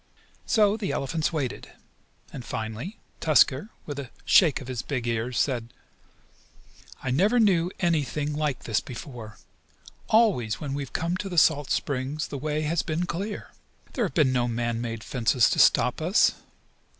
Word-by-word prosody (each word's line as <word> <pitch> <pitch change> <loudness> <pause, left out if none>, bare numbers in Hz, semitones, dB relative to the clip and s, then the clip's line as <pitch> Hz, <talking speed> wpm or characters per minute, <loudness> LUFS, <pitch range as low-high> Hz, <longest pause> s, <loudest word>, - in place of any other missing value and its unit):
So 210 -2 +3
the 210 -3 -2
elephants 155 +4 -1
waited, 145 -6 -4 0.6
and 125 - -7
finally 115 - -5 0.2
Tusker 155 +2 +3 0.2
with 145 -2 -5
a 135 -3 -6 0.2
shake 165 -7 +5
of 130 - -10
his 125 -3 -3
big 130 -5 -3
ears, 115 +1 -2
said: 120 -4 -1 1.3
"I 130 - -1
never 200 - +3
knew 180 -6 +3
anything 150 -3 0
like 150 -3 -2
this 110 -3 +1
before. 120 -4 -9 0.7
Always 195 - +3
when 140 -3 -4
we 145 - -2
have 135 - -8
come 170 +2 -1
to 195 - -5
the 175 - -5
salt 145 -3 +4
springs 140 +2 -2
the 140 - -5
way 150 +2 -2
has 160 +2 0
been 165 +2 -2
clear. 200 +5 -5 0.4
There 245 - 0
have 185 - -6
been 145 -6 +3
no 120 -1 +1
man 120 0 -2
made 115 -2 -5
fences 125 -1 +2
to - - 0
stop - - +4
us. - - +4
145 Hz, 160 wpm, -26 LUFS, 125-170 Hz, 1.3 s, shake